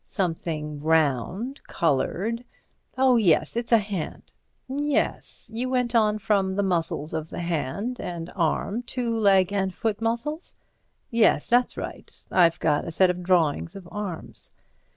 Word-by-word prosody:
"Something 160 -5 -2
round—coloured—oh, 180 - 0
yes—it's 230 +4 +2
a 230 - +8
hand." 200 -6 -5 0.4
"Yes. 285 -3 -1
You 245 +3 -2
went 250 -2 0
on 215 -2 +3
from 195 -3 +1
the 200 - +1
muscles 165 -5 -1
of 160 0 -3
the - - -5
hand 175 - -2
and 170 -1 -5
arm 195 +5 0 0.2
to 235 -2 0
leg 200 -3 +4
and 190 -1 0
foot 220 -1 -1
muscles?" 240 +9 -2 0.6
"Yes; 230 -2 +4
that's 245 +1 +2
right. - - -6 0.2
I've 170 -2 +4
got 150 -1 +1
a - - -3
set 185 +2 +4
of 180 0 -6
drawings 165 - +1
of 190 -3 -9
arms." 205 -6 -5
195 Hz, 130 wpm, -25 LUFS, 165-230 Hz, 0.6 s, a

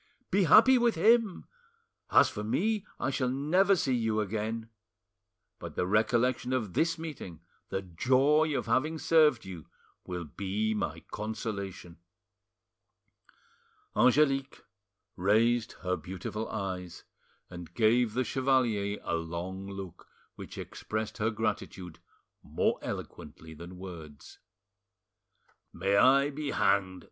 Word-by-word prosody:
Be 195 0 +3
happy 230 - +7
with 235 -3 +2
him! 220 +3 +3 0.6
As - - +6
for 105 - -5
me, 210 - 0
I 130 - -1
shall 130 -2 0
never 175 +9 +3
see 135 -7 0
you 110 -3 0
again; 110 +2 -3 0.9
but - - -8
the - - 0
recollection 120 +5 +1
of 110 -8 -2
this 165 - +1
meeting, 145 - -8 0.3
the 95 - -3
joy 135 - +2
of - - -3
having 155 +5 0
served 155 -7 +3
you, 90 -4 -9 0.4
will 90 -1 -4
be 100 +7 -2
my 105 - -3
consolation." 100 -5 -5 2.0
Angelique 135 +1 +2 0.5
raised 110 +5 +2
her 90 0 0
beautiful 95 +5 -6
eyes, 95 -4 -5 0.5
and 85 -1 -10
gave 115 0 +3
the 130 - +2
chevalier 120 -6 0
a - - -3
long 85 +4 -5
look 95 -3 -9 0.3
which - - -10
expressed 110 +1 -5
her 110 +1 +1
gratitude 105 -5 -4 0.4
more - - -1
eloquently 80 0 -8
than 85 +3 -10
words. 80 -6 -11 1.3
"May 100 +1 0
I 140 +6 +5
be 145 0 -4
hanged!" 95 -6 +1
110 Hz, 115 wpm, -29 LUFS, 95-135 Hz, 2.0 s, happy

